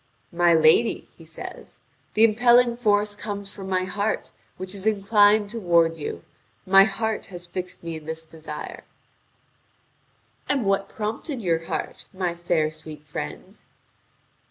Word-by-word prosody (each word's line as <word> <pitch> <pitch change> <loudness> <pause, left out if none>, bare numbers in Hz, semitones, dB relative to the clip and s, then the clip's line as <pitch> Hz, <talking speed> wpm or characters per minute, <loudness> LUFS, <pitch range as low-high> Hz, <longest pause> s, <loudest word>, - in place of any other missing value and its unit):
"My 175 0 +4
lady," 160 +9 +4
he - - -15
says, - - -9 0.4
"the 215 - +5
impelling 240 +2 +5
force 210 -3 +2
comes 200 -1 -5
from 190 -1 -8
my 185 -1 +1
heart, 205 +3 -2 0.3
which 185 +1 -5
is 200 +1 -3
inclined 205 0 +4
toward 170 -7 +2
you. 145 - -6 0.4
My 195 +1 +7
heart 220 +1 -2
has 175 -2 -7
fixed 180 0 -6
me 165 -1 -4
in 155 - -12
this 160 +1 -5
desire." 155 -1 -8 1.7
"And 270 -6 +1
what 195 0 +1
prompted 225 +4 -4
your 165 -2 0
heart, - - -4
my 180 -2 -1
fair 170 -3 0
sweet 155 -1 -10
friend?" 75 - -7
195 Hz, 135 wpm, -24 LUFS, 165-210 Hz, 1.7 s, My